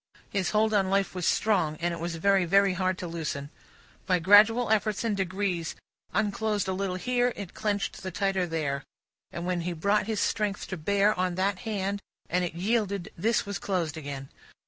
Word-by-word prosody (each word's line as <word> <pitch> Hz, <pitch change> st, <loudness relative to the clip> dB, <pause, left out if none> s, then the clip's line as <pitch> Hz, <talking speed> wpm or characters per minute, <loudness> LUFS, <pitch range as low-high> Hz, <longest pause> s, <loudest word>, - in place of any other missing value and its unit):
His 195 Hz, -3 st, 0 dB
hold 215 Hz, 0 st, +2 dB
on 195 Hz, -2 st, +3 dB
life 195 Hz, 0 st, +1 dB
was 180 Hz, -2 st, -2 dB
strong, 185 Hz, -8 st, +2 dB
and 175 Hz, 0 st, 0 dB
it 170 Hz, -, -5 dB
was 170 Hz, 0 st, -3 dB
very, 195 Hz, +3 st, +3 dB
very 195 Hz, +2 st, +4 dB
hard, 185 Hz, 0 st, 0 dB
to 180 Hz, -, -5 dB
loosen; 150 Hz, -4 st, -4 dB, 0.6 s
by 185 Hz, -2 st, +4 dB
gradual 210 Hz, +6 st, +6 dB
efforts 215 Hz, 0 st, +1 dB
and 225 Hz, -3 st, 0 dB
degrees 185 Hz, -3 st, -2 dB, 0.4 s
unclosed 210 Hz, -1 st, 0 dB
a 190 Hz, -, 0 dB
little 190 Hz, -1 st, -2 dB
here, 245 Hz, +5 st, +1 dB
it 200 Hz, -4 st, -7 dB
clenched 205 Hz, -2 st, -2 dB
the 190 Hz, -, -4 dB
tighter 190 Hz, 0 st, 0 dB
there; 150 Hz, -4 st, -2 dB, 0.5 s
and 170 Hz, +1 st, -5 dB
when 180 Hz, -1 st, 0 dB
he 175 Hz, +1 st, -2 dB
brought 200 Hz, +5 st, +1 dB
his 220 Hz, -2 st, -1 dB
strength 210 Hz, -1 st, 0 dB
to 185 Hz, -, -3 dB
bear 200 Hz, +5 st, +2 dB
on 180 Hz, -1 st, 0 dB
that 190 Hz, +1 st, 0 dB
hand 200 Hz, -3 st, -2 dB, 0.3 s
and 180 Hz, +1 st, +2 dB
it 170 Hz, -2 st, -3 dB
yielded, 200 Hz, 0 st, -1 dB
this 220 Hz, +6 st, +1 dB
was 200 Hz, 0 st, -4 dB
closed 175 Hz, -6 st, -1 dB
again. 140 Hz, -3 st, -6 dB
190 Hz, 190 wpm, -28 LUFS, 175-205 Hz, 0.6 s, gradual